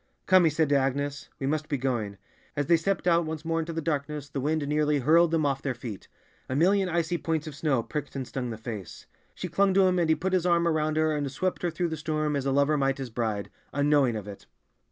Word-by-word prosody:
"Come," 185 Hz, -2 st, +6 dB
he -, -, +5 dB
said 155 Hz, +1 st, +1 dB
to 145 Hz, -, +3 dB
Agnes, 140 Hz, +1 st, -1 dB
"we 135 Hz, -, -2 dB
must 150 Hz, +2 st, -1 dB
be 140 Hz, -, 0 dB
going." 120 Hz, -6 st, -2 dB, 0.4 s
As 145 Hz, -, 0 dB
they 170 Hz, -, +5 dB
stepped 180 Hz, +2 st, -1 dB
out 170 Hz, -1 st, +4 dB
once 160 Hz, 0 st, -5 dB
more 165 Hz, 0 st, 0 dB
into 165 Hz, +1 st, -3 dB
the 165 Hz, -1 st, -3 dB
darkness, 150 Hz, -2 st, -2 dB
the 135 Hz, -1 st, -3 dB
wind 150 Hz, +1 st, 0 dB
nearly 150 Hz, 0 st, +2 dB
hurled 160 Hz, +5 st, +4 dB
them 160 Hz, -2 st, +1 dB
off 135 Hz, -1 st, 0 dB
their 135 Hz, -3 st, -2 dB
feet; 115 Hz, -4 st, -8 dB, 0.4 s
a 130 Hz, -, -1 dB
million 190 Hz, +5 st, +3 dB
icy 170 Hz, 0 st, 0 dB
points 160 Hz, -2 st, -1 dB
of 155 Hz, -, -6 dB
snow 140 Hz, -5 st, 0 dB
pricked 145 Hz, +2 st, -5 dB
and 130 Hz, -2 st, -4 dB
stung 125 Hz, -2 st, -4 dB
the 110 Hz, -, -5 dB
face. 110 Hz, -5 st, -7 dB, 0.3 s
She 180 Hz, -, -4 dB
clung 195 Hz, +2 st, +2 dB
to 195 Hz, -1 st, +6 dB
him, 185 Hz, -1 st, +2 dB
and 165 Hz, -2 st, +1 dB
he 160 Hz, -, +5 dB
put 190 Hz, +3 st, -2 dB
his 180 Hz, -1 st, +2 dB
arm 170 Hz, -1 st, +3 dB
around 155 Hz, -1 st, +1 dB
her 155 Hz, -1 st, +2 dB
and 145 Hz, -2 st, -2 dB
swept 185 Hz, +7 st, -2 dB
her 175 Hz, -, 0 dB
through 170 Hz, +1 st, -2 dB
the 160 Hz, -, -4 dB
storm 155 Hz, -1 st, -1 dB
as 140 Hz, -1 st, -1 dB
a -, -, +2 dB
lover 140 Hz, +2 st, +3 dB
might 135 Hz, -1 st, +1 dB
his 130 Hz, -3 st, -6 dB
bride, 110 Hz, -3 st, -2 dB, 0.2 s
unknowing 145 Hz, -4 st, +3 dB
of 105 Hz, -2 st, -5 dB
it. 100 Hz, -1 st, -10 dB
150 Hz, 255 wpm, -27 LUFS, 135-165 Hz, 0.4 s, Come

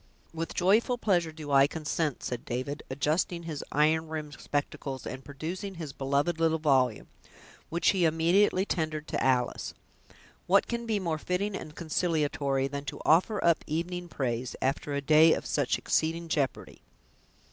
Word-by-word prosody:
"With 165 Hz, 0 st, -4 dB
joyful 215 Hz, +7 st, +3 dB
pleasure 175 Hz, -8 st, +1 dB
do 155 Hz, -2 st, -8 dB
I 140 Hz, 0 st, +6 dB
consent", 155 Hz, -2 st, -2 dB
said 125 Hz, -1 st, -4 dB
David, 130 Hz, +4 st, -4 dB
adjusting 155 Hz, +5 st, 0 dB
his 155 Hz, -4 st, -5 dB
iron 155 Hz, +2 st, +2 dB
rimmed 155 Hz, -2 st, -5 dB
spectacles, 140 Hz, -2 st, -3 dB
and 130 Hz, +1 st, -6 dB
producing 170 Hz, +8 st, -6 dB
his 160 Hz, -5 st, -6 dB
beloved 140 Hz, +5 st, 0 dB
little 160 Hz, -1 st, +3 dB
volume, 130 Hz, -7 st, +2 dB, 0.6 s
which 170 Hz, +1 st, +2 dB
he 185 Hz, -3 st, +3 dB
immediately 175 Hz, +5 st, +3 dB
tendered 155 Hz, -4 st, -2 dB
to -, -, -1 dB
Alice. 125 Hz, -2 st, 0 dB, 0.7 s
"What 195 Hz, +2 st, +5 dB
can 235 Hz, -1 st, -4 dB
be 215 Hz, -2 st, +1 dB
more 165 Hz, -4 st, -2 dB
fitting 190 Hz, +5 st, -1 dB
and 155 Hz, -4 st, -7 dB
consolatory, 150 Hz, -5 st, 0 dB
than 140 Hz, +1 st, -5 dB
to 135 Hz, -, -6 dB
offer 185 Hz, +6 st, +3 dB
up 170 Hz, -1 st, +3 dB
evening 175 Hz, +3 st, -3 dB
praise, 125 Hz, -5 st, -3 dB
after 140 Hz, +2 st, -1 dB
a 140 Hz, -, -1 dB
day 155 Hz, +3 st, +6 dB
of -, -, -3 dB
such 145 Hz, -4 st, 0 dB
exceeding 165 Hz, +1 st, 0 dB
jeopardy!" 145 Hz, -3 st, -2 dB
155 Hz, 155 wpm, -29 LUFS, 140-170 Hz, 0.7 s, I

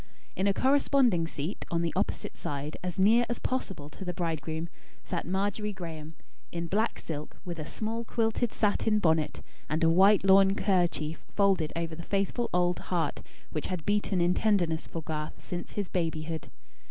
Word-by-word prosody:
In 190 Hz, -, +1 dB
a -, -, +5 dB
corresponding 260 Hz, -, +3 dB
seat, 160 Hz, +4 st, -4 dB
on 170 Hz, 0 st, 0 dB
the 165 Hz, -, -1 dB
opposite -, -, -2 dB
side, 145 Hz, +1 st, -4 dB
as 180 Hz, -1 st, -3 dB
near 220 Hz, +5 st, +5 dB
as 240 Hz, -, -1 dB
possible 195 Hz, -, -3 dB
to 170 Hz, -, -9 dB
the 180 Hz, -2 st, -4 dB
bridegroom, 160 Hz, -1 st, -2 dB, 0.4 s
sat 175 Hz, -3 st, -3 dB
Margery 205 Hz, +3 st, -1 dB
Graem, 160 Hz, -4 st, -7 dB, 0.4 s
in 170 Hz, 0 st, -3 dB
black 210 Hz, +6 st, 0 dB
silk, 150 Hz, -2 st, -6 dB
with 170 Hz, -2 st, -5 dB
a 155 Hz, -, -5 dB
small 225 Hz, +2 st, -3 dB
quilted 225 Hz, 0 st, 0 dB
satin 215 Hz, +1 st, +2 dB
bonnet, 160 Hz, -6 st, +1 dB, 0.3 s
and 155 Hz, +3 st, +1 dB
a 165 Hz, -, +6 dB
white 195 Hz, +4 st, +6 dB
lawn 195 Hz, 0 st, +6 dB
kerchief 175 Hz, -6 st, +1 dB
folded 195 Hz, -6 st, +3 dB
over 165 Hz, -1 st, -2 dB
the 165 Hz, -, -6 dB
faithful 200 Hz, +6 st, -1 dB
old 180 Hz, 0 st, +2 dB
heart 165 Hz, -5 st, 0 dB, 0.3 s
which 155 Hz, -, -2 dB
had 180 Hz, -4 st, -4 dB
beaten 205 Hz, -3 st, +1 dB
in 175 Hz, +1 st, +4 dB
tenderness 180 Hz, -8 st, +1 dB
for 165 Hz, -, -5 dB
Garth 150 Hz, -1 st, -5 dB
since 175 Hz, -1 st, -5 dB
his 205 Hz, -2 st, -2 dB
babyhood. 160 Hz, -3 st, -2 dB
180 Hz, 170 wpm, -29 LUFS, 160-205 Hz, 0.4 s, a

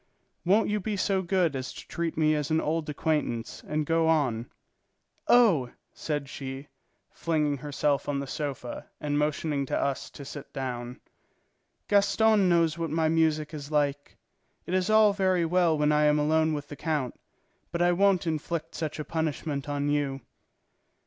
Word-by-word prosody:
"Won't 200 Hz, +5 st, +3 dB
you 210 Hz, 0 st, 0 dB
be 205 Hz, +1 st, -3 dB
so 190 Hz, 0 st, +1 dB
good 175 Hz, -4 st, +1 dB
as 130 Hz, -1 st, -4 dB
to -, -, -11 dB
treat 170 Hz, -2 st, -3 dB
me 155 Hz, -1 st, +3 dB
as 150 Hz, -1 st, -1 dB
an 160 Hz, 0 st, +2 dB
old 160 Hz, 0 st, -1 dB
acquaintance 150 Hz, -6 st, -2 dB
and 150 Hz, 0 st, -1 dB
go 165 Hz, +1 st, +2 dB
on?" 130 Hz, -8 st, +1 dB, 0.8 s
"Oh," 195 Hz, -, +5 dB, 0.2 s
said 145 Hz, -3 st, -3 dB
she, 135 Hz, +1 st, -7 dB, 0.4 s
flinging 150 Hz, -3 st, 0 dB
herself 145 Hz, +1 st, -1 dB
on 145 Hz, -, 0 dB
the 140 Hz, -, -3 dB
sofa 140 Hz, -3 st, -5 dB
and 145 Hz, 0 st, -1 dB
motioning 150 Hz, -1 st, -1 dB
to -, -, -1 dB
us 140 Hz, -1 st, -2 dB
to 140 Hz, -, -10 dB
sit 145 Hz, 0 st, -9 dB
down, 125 Hz, -2 st, -5 dB, 0.9 s
"Gaston 205 Hz, 0 st, +4 dB
knows 170 Hz, -2 st, +2 dB
what 165 Hz, -1 st, -2 dB
my 160 Hz, +1 st, +1 dB
music 155 Hz, -1 st, +1 dB
is 145 Hz, -2 st, -7 dB
like. 145 Hz, -2 st, -1 dB, 0.5 s
It 180 Hz, -, -4 dB
is 185 Hz, +2 st, +1 dB
all 215 Hz, -1 st, +6 dB
very 185 Hz, -3 st, +2 dB
well 170 Hz, -1 st, +2 dB
when 150 Hz, 0 st, +2 dB
I 150 Hz, 0 st, +3 dB
am 150 Hz, 0 st, +4 dB
alone 155 Hz, +1 st, +2 dB
with 145 Hz, -1 st, -6 dB
the 145 Hz, -, -7 dB
count, 150 Hz, -5 st, -2 dB, 0.6 s
but 170 Hz, 0 st, 0 dB
I 175 Hz, -, +4 dB
won't 195 Hz, 0 st, +3 dB
inflict 160 Hz, 0 st, -3 dB
such 155 Hz, -2 st, -4 dB
a 150 Hz, -, -5 dB
punishment 155 Hz, -2 st, -3 dB
on 145 Hz, 0 st, -1 dB
you." 145 Hz, -2 st, 0 dB
155 Hz, 170 wpm, -28 LUFS, 145-170 Hz, 0.9 s, all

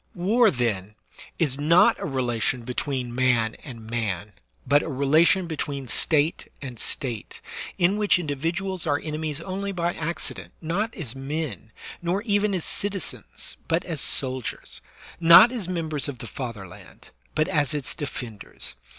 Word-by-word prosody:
War, 215 Hz, +6 st, +4 dB
then, 110 Hz, -, -1 dB, 0.4 s
is 145 Hz, -5 st, 0 dB
not 165 Hz, +4 st, +5 dB
a -, -, -4 dB
relation 125 Hz, -3 st, 0 dB
between 125 Hz, 0 st, -2 dB
man 120 Hz, -3 st, +2 dB
and 115 Hz, -6 st, -9 dB
man, 105 Hz, -4 st, -2 dB, 0.3 s
but 145 Hz, +1 st, +4 dB
a -, -, -5 dB
relation 155 Hz, +7 st, +4 dB
between 145 Hz, -4 st, -4 dB
State 155 Hz, +5 st, +1 dB
and 125 Hz, -5 st, -7 dB
State, 120 Hz, -7 st, -4 dB, 0.4 s
in 185 Hz, +3 st, +3 dB
which 210 Hz, -3 st, +4 dB
individuals 170 Hz, +4 st, -2 dB
are 145 Hz, -1 st, +2 dB
enemies 155 Hz, -1 st, -3 dB
only 195 Hz, +3 st, -3 dB
by 175 Hz, -2 st, -1 dB
accident, 165 Hz, +2 st, -4 dB
not 185 Hz, +8 st, -1 dB
as 135 Hz, -, -3 dB
men, 135 Hz, -5 st, -4 dB, 0.3 s
nor 180 Hz, +4 st, -1 dB
even 205 Hz, -2 st, +2 dB
as 175 Hz, -, -2 dB
citizens, 200 Hz, -2 st, -2 dB
but 165 Hz, +2 st, +1 dB
as 160 Hz, -6 st, -4 dB
soldiers; 130 Hz, -2 st, +2 dB, 0.4 s
not 170 Hz, +8 st, +9 dB
as 230 Hz, -8 st, -2 dB
members 160 Hz, -5 st, -1 dB
of 140 Hz, -3 st, -5 dB
the 120 Hz, -, -7 dB
father 115 Hz, -3 st, -6 dB
land, 95 Hz, +1 st, -15 dB, 0.2 s
but 155 Hz, -, +2 dB
as 150 Hz, -2 st, +1 dB
its 140 Hz, -6 st, -2 dB
defenders. 115 Hz, -, -7 dB
150 Hz, 145 wpm, -25 LUFS, 125-175 Hz, 0.4 s, not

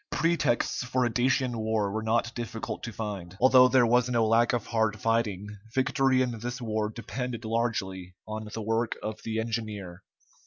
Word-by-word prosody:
Pretexts 165 Hz, -8 st, +1 dB
for 125 Hz, 0 st, 0 dB
a 120 Hz, -, 0 dB
Dacian 125 Hz, 0 st, +1 dB
war 110 Hz, -2 st, 0 dB
were 110 Hz, +2 st, -2 dB
not 115 Hz, +1 st, 0 dB
difficult 115 Hz, -1 st, -5 dB
to 115 Hz, -, -5 dB
find. 100 Hz, -5 st, -6 dB
Although 130 Hz, 0 st, +7 dB
there 130 Hz, -1 st, +4 dB
was 125 Hz, +1 st, +3 dB
no 115 Hz, -2 st, +2 dB
lack 115 Hz, +2 st, +4 dB
of 120 Hz, -3 st, -1 dB
hard 110 Hz, -2 st, 0 dB
fighting, 110 Hz, -4 st, 0 dB, 0.3 s
victory 130 Hz, 0 st, +3 dB
in 120 Hz, -3 st, -3 dB
this 120 Hz, +3 st, -4 dB
war 110 Hz, -2 st, -1 dB
depended 115 Hz, +1 st, -5 dB
largely 95 Hz, -6 st, -2 dB
on 110 Hz, 0 st, -5 dB
the 110 Hz, -, -4 dB
work 115 Hz, +2 st, 0 dB
of 110 Hz, 0 st, -4 dB
the 110 Hz, 0 st, -2 dB
engineer. 105 Hz, -5 st, -4 dB
115 Hz, 170 wpm, -28 LUFS, 110-120 Hz, 0.3 s, Although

